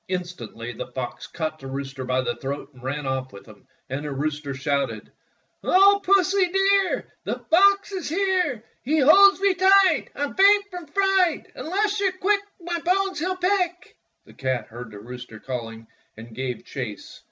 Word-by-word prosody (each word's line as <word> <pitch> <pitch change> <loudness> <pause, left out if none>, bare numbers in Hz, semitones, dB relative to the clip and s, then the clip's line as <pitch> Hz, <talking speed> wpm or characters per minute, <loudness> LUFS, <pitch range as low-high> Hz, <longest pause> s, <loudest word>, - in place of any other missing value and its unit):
Instantly 170 - -5
the - - -6
fox 125 -1 -5
caught 155 -1 -4
the 135 - -9
rooster 135 0 -5
by 130 0 0
the 130 - -2
throat 140 +2 -6
and 125 - -17
ran 140 +3 -3
oflf 130 -1 -3
with 100 - -13
him, 105 -3 -17 0.2
and 140 +2 -4
the 150 - -4
rooster 145 0 -3
shouted: 135 -5 -2 0.3
— - - -45
"O 400 +2 +5
Pussy, 390 0 +3
dear. 390 0 +2 0.2
The - - -3
fox 395 +3 +5
is 370 -6 -4
here! 360 - 0 0.2
He 310 +5 +1
holds 390 +8 +7
me 395 -1 +3
tight 375 - +4
— - - -36
I 285 - -3
'm 290 - -3
faint 400 +1 +5
from 355 -3 -8
fright. 385 +1 +1
Unless 405 +5 -1
you 400 - +2
're 375 - -11
quick 400 +2 +2 0.2
My 345 0 -3
bones 380 +2 0
he'll 370 +3 -2
pick!" 360 -1 -1 0.3
The - - -17
cat 130 -2 -2
heard 120 +1 -9
the 105 - -11
rooster 120 +1 -10
calling 115 -3 -6 0.3
and 115 +1 -11
gave 125 -1 -5
chase. 120 -7 -7
260 Hz, 185 wpm, -24 LUFS, -, 0.3 s, holds